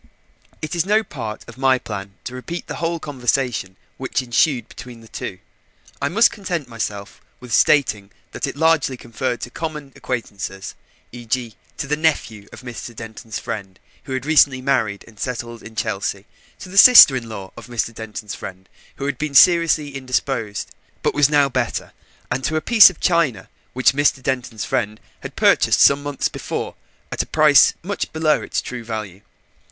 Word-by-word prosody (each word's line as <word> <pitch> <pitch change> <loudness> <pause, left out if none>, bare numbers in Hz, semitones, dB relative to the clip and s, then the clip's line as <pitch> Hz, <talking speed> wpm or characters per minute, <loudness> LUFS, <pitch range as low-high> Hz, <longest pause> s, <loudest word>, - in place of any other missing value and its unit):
It 155 - -4
is 170 - +2
no 210 +4 +2
part 115 - -7
of - - -12
my 135 -1 +4
plan 100 -4 -7
to 125 - -7
repeat 165 +7 -6
the - - -6
whole 170 0 -2
conversation 125 -8 -2 0.2
which 130 0 -2
ensued 125 +2 +1
between 120 -2 -11
the 115 - -15
two. - - -6 0.6
I 140 - 0
must 225 +8 +4
content 175 - -4
myself 105 -4 -6 0.2
with 125 -3 -8
stating 110 -11 +3 0.2
that - - -3
it - - -5
largely 155 -4 +2
referred 120 +1 -3
to 120 - -6
common 150 -3 -6
acquaintances, 100 -5 -5 0.4
e.g., 120 -1 -4 0.2
to - - -3
the 150 +2 0
nephew 145 -10 -1
of - - -11
Mr. 120 -1 -8
Denton's 110 0 -7
friend 100 -4 -6 0.3
who 135 - -5
had 130 0 -3
recently 145 -4 +4
married 110 -6 -1
and 110 -3 -17
settled 120 -2 -5
in 110 +1 -12
Chelsea, 100 -1 -3 0.3
to - - -10
the 195 +2 +4
sister 235 - +10
in 120 -3 -4
law 100 -3 -8
of 120 0 -11
Mr. 120 -1 -2
Denton's 105 -2 -7
friend 95 0 -9 0.3
who 140 - -5
had 140 - -3
been 150 -2 -3
seriously 165 -3 +5
indisposed, 125 -5 -2 0.3
but - - +1
was 145 -1 +4
now 145 -2 +4
better, 125 -3 -3 0.4
and 130 - -1
to 155 - -1
a - - +2
piece 220 +4 +8
of 180 - -12
china 150 - +1 0.2
which 130 +1 +3
Mr. 145 -1 +1
Denton's 125 -5 -3
friend 105 +1 -2 0.2
had - - -9
purchased - - +3
some 140 +1 +6
months 145 -1 -2
before - - -5 0.4
at - - -1
a - - -6
price 150 -3 +5
much 200 +3 -3
below 160 -1 +1
its - - -3
true 125 -2 -6
value. 105 -4 -6
130 Hz, 175 wpm, -20 LUFS, 110-150 Hz, 0.6 s, sister